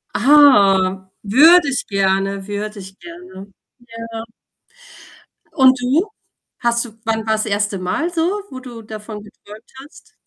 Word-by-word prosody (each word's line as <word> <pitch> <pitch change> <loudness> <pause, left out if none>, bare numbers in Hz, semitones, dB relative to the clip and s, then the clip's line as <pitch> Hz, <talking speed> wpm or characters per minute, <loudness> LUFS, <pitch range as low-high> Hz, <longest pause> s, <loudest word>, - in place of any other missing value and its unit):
Ah, 195 -9 +4
würde 315 - +5
ich 265 - -3
gerne, 195 0 -1
würde 205 0 -6
ich 190 0 -12
gerne. 180 +3 -12 0.6
Ja. 225 0 -6 1.3
Und 260 -2 +4
du? 295 +11 0 0.5
Hast 235 0 0
du 225 - -13
wann 220 -1 -2
war 220 - +2
das 215 0 -1
1. 205 -1 -2
Mal 185 - -2
so, 330 - -2 0.3
wo 260 - -9
du 245 -3 -11
davon 215 -1 -9
geträumt 210 +2 -16
hast? 290 - -19
215 Hz, 135 wpm, -18 LUFS, 195-255 Hz, 1.3 s, würde